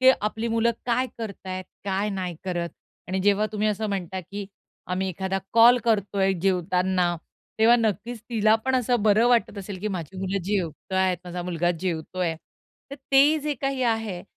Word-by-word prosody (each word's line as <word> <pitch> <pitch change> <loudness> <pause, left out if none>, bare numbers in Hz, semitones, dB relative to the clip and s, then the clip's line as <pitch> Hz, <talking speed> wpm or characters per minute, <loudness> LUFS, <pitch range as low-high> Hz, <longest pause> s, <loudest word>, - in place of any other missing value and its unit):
ते 260 0 +8
आपली 220 +2 -2
मुलं 230 +1 +2 0.2
काय 250 +2 +2
करतायेत, 190 -4 -5 0.2
काय 200 +1 0
नाही 185 -3 -3
करत 175 -2 -2 0.4
आणि 190 +1 -1
जेव्हा, 205 +1 +3
तुम्ही 215 0 +1
असं 215 +1 -1
म्हणता, 190 -2 -3
की 200 +3 -7 0.4
आम्ही 185 +1 -1
एखादा 190 +2 -2
कॉल 235 +2 +7
करतोय 200 -3 +2
जेवताना, 180 -1 +1 0.4
तेव्हा 230 +2 +6
नक्कीच 225 +1 -1
तिला 215 -1 +4
पण 265 0 +1
असं 245 -2 +1
बरं 215 +3 +4
वाटत 235 -4 +2
असेल, 195 0 -6
की 215 - -2
माझी 185 -2 -5
मुलं 195 0 -2
जेवताय. 190 0 0
माझा 180 0 -5
मुलगा 175 -1 0
जेवतोय. 175 -1 -2 0.6
तर 280 - -5 0.2
ते 290 +3 +6
जे 300 0 -1
काही 270 -1 -1
आहे 225 -6 -1
200 Hz, 165 wpm, -25 LUFS, 185-225 Hz, 0.6 s, ते